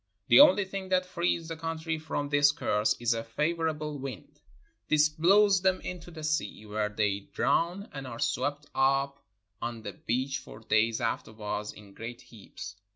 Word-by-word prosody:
The - - +8
only 275 -9 +7
thing 190 0 -6
that 185 0 +2
frees 170 -2 -1
the 165 - -4
country 165 0 -3
from 150 -2 -3
this 145 0 +5
curse 105 -8 +1
is 120 0 +2
a 115 0 -3
favor 160 +8 0
able 150 -2 -4
wind; 130 -3 -8 0.5
this 150 0 +4
blows 195 +5 +4
them 190 0 +2
into 180 -1 -7
the 160 -2 -9
sea, 155 -8 -2
where 105 0 -1
they 105 -2 0
drown 175 - 0
and 135 -2 -6
are 115 -2 -7
swept 145 +5 -1
up 135 +1 +1 0.4
on 115 -1 -4
the 100 - -5
beach 130 +7 -2
for 130 - -12
days 110 +1 +1
after - - -2
wards 105 -1 -4
in 100 -2 -14
great 115 +3 -8
heaps. 100 -2 -10
145 Hz, 175 wpm, -29 LUFS, 115-165 Hz, 0.5 s, The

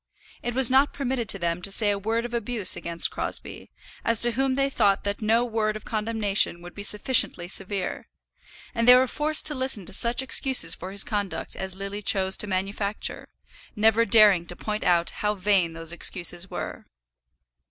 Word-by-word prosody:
It 240 0 -4
was 260 -2 +5
not 270 +2 +3
permitted 255 -5 -3
to 195 - +3
them 170 -1 -2
to 195 - -4
say 205 +1 +2
a 200 - -2
word 225 +3 -2
of 240 - -8
abuse 230 -3 0
against 170 0 +1
Crosbie, - - -5 0.3
as 230 -2 +1
to 240 - +6
whom 265 +2 -1
they 275 0 +1
thought 200 -7 +1
that 200 +1 -4
no 225 +3 +2
word 220 -2 -2
of 215 - -9
condemnation 210 -5 -1
could 175 - -11
be 205 - -9
sufficiently 210 -3 +3
severe; 195 +1 -4 0.7
and 230 -1 -1
they 250 - +10
were 255 +1 +4
forced 305 +4 0
to 305 - +3
listen 260 -8 -3
to - - -5
such 235 +5 +1
excuses 265 0 +2
for 185 - -8
his 200 0 +3
conduct 205 -3 -4
as 190 -1 -6
Lily 200 +1 -6
chose 190 -1 +1
to 210 - -2
manufacture, 200 +2 -3 0.5
never 220 +1 +3
daring 205 -5 +5
to 175 - -6
point 210 +2 -4
out 170 -1 +1
how 210 0 -2
vain 190 -4 +1
those 165 0 -5
excuses 175 +1 -2
were. - - -7
210 Hz, 185 wpm, -24 LUFS, 190-235 Hz, 0.7 s, they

